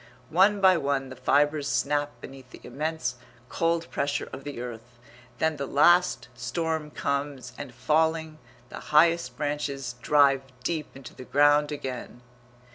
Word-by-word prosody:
One 195 Hz, +4 st, +4 dB
by 185 Hz, -2 st, +6 dB
one 140 Hz, -3 st, -1 dB
the 130 Hz, -, -9 dB
fibres 145 Hz, +3 st, +2 dB
snap 145 Hz, +3 st, -1 dB
beneath 135 Hz, -1 st, -11 dB
the -, -, -13 dB
immense 140 Hz, -2 st, -3 dB, 0.3 s
cold 165 Hz, 0 st, 0 dB
pressure 140 Hz, 0 st, -1 dB
of 135 Hz, -, -7 dB
the 145 Hz, -4 st, -6 dB
earth, 120 Hz, 0 st, -8 dB, 0.4 s
then 160 Hz, +3 st, 0 dB
the 140 Hz, -1 st, -4 dB
last 175 Hz, +6 st, +4 dB
storm 150 Hz, +6 st, -3 dB
comes 140 Hz, -2 st, -3 dB
and, 145 Hz, -3 st, -8 dB
falling, 155 Hz, +4 st, 0 dB, 0.3 s
the -, -, -8 dB, 0.2 s
highest 165 Hz, -5 st, +4 dB
branches 145 Hz, -3 st, -3 dB
drive 140 Hz, -2 st, +4 dB, 0.2 s
deep 155 Hz, +2 st, -2 dB
into 135 Hz, -3 st, -11 dB
the -, -, -10 dB
ground 145 Hz, +2 st, +4 dB
again. 130 Hz, -4 st, -6 dB
145 Hz, 140 wpm, -27 LUFS, 130-160 Hz, 0.4 s, by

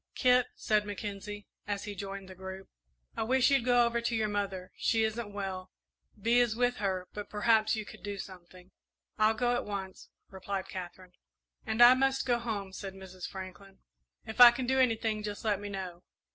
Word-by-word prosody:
"Kit," 250 Hz, -1 st, +4 dB
said 215 Hz, -1 st, +1 dB
Mackenzie, 205 Hz, 0 st, -6 dB, 0.2 s
as 205 Hz, -1 st, -2 dB
he 205 Hz, -, -5 dB
joined 195 Hz, 0 st, -6 dB
the 190 Hz, -, -10 dB
group, 190 Hz, +1 st, -8 dB, 0.5 s
"I -, -, -2 dB
wish 255 Hz, +4 st, +3 dB
you'd 275 Hz, -3 st, +3 dB
go 245 Hz, -1 st, +4 dB
over 235 Hz, 0 st, 0 dB
to 235 Hz, 0 st, -1 dB
your 220 Hz, -1 st, +1 dB
mother 200 Hz, -3 st, -3 dB
she 225 Hz, -1 st, +1 dB
isn't 220 Hz, -1 st, -2 dB
well. 190 Hz, -2 st, -5 dB, 0.5 s
Bee 230 Hz, +4 st, +3 dB
is 240 Hz, -3 st, +2 dB
with 245 Hz, +1 st, +1 dB
her, 190 Hz, -3 st, -2 dB
but 210 Hz, -1 st, -6 dB
perhaps 215 Hz, +1 st, +3 dB
you 215 Hz, -1 st, -4 dB
could 215 Hz, -, -12 dB
do 205 Hz, -1 st, -5 dB
something." 185 Hz, -1 st, -11 dB, 0.5 s
"I'll 215 Hz, +1 st, +4 dB
go 245 Hz, +2 st, +1 dB
at 245 Hz, -, 0 dB
once," 195 Hz, -2 st, -6 dB, 0.2 s
replied 190 Hz, 0 st, -4 dB
Katherine. 185 Hz, 0 st, -8 dB, 0.5 s
"And 220 Hz, +2 st, +5 dB
I 245 Hz, +1 st, +10 dB
must 270 Hz, +1 st, +1 dB
go 240 Hz, -2 st, +2 dB
home," 205 Hz, -5 st, -4 dB
said 195 Hz, -1 st, -7 dB
Mrs. 185 Hz, -1 st, -8 dB
Franklin. 190 Hz, +1 st, -9 dB, 0.5 s
"If 220 Hz, +2 st, -1 dB
I 245 Hz, -, +13 dB
can 245 Hz, +2 st, -3 dB
do 265 Hz, +1 st, +2 dB
anything, 225 Hz, -3 st, +1 dB
just 210 Hz, +1 st, -6 dB
let 205 Hz, -3 st, +1 dB
me 205 Hz, 0 st, -6 dB
know." 185 Hz, -3 st, -6 dB
205 Hz, 190 wpm, -31 LUFS, 190-235 Hz, 0.5 s, I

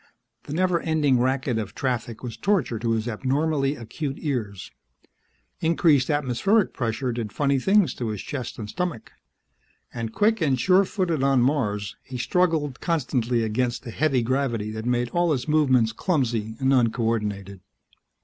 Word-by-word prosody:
The 145 Hz, -, -6 dB
never 180 Hz, 0 st, +2 dB
ending 150 Hz, -6 st, +2 dB
racket 130 Hz, -1 st, 0 dB
of 105 Hz, -1 st, -6 dB
traffic 120 Hz, -3 st, -3 dB
was 120 Hz, -3 st, -5 dB
torture 175 Hz, -, 0 dB
to 115 Hz, 0 st, 0 dB
his 110 Hz, +1 st, -1 dB
abnormally 135 Hz, +4 st, 0 dB
acute 135 Hz, +4 st, -5 dB
ears. 115 Hz, -, -4 dB, 0.9 s
Increased 160 Hz, -5 st, +3 dB
atmospheric 150 Hz, -, +1 dB
pressure 125 Hz, +1 st, -2 dB
did 115 Hz, -3 st, -4 dB
funny 140 Hz, -2 st, +1 dB
things 195 Hz, +5 st, +3 dB
to 120 Hz, -, -4 dB
his 105 Hz, -3 st, -4 dB
chest 130 Hz, -5 st, -5 dB
and 110 Hz, -, -6 dB
stomach. 175 Hz, -, -4 dB, 0.8 s
And 115 Hz, -2 st, -4 dB
quick 215 Hz, -, +2 dB
and 135 Hz, -5 st, +2 dB
sure 185 Hz, +8 st, +4 dB
footed 180 Hz, -7 st, -1 dB
on 135 Hz, -2 st, +3 dB
Mars, 105 Hz, -7 st, -1 dB
he 130 Hz, -, -8 dB
struggled 155 Hz, -1 st, 0 dB
constantly 125 Hz, -7 st, 0 dB
against 120 Hz, +3 st, -1 dB
the 120 Hz, -, -7 dB
heavy 135 Hz, -2 st, +1 dB
gravity 120 Hz, -4 st, -1 dB
that 110 Hz, +1 st, -6 dB
made 120 Hz, 0 st, +1 dB
all 175 Hz, +1 st, +1 dB
his 125 Hz, -3 st, -3 dB
movements 130 Hz, -7 st, +3 dB
clumsy 115 Hz, -, -1 dB
and 135 Hz, 0 st, +2 dB
uncoordinated. 110 Hz, -5 st, 0 dB
130 Hz, 150 wpm, -24 LUFS, 115-155 Hz, 0.9 s, sure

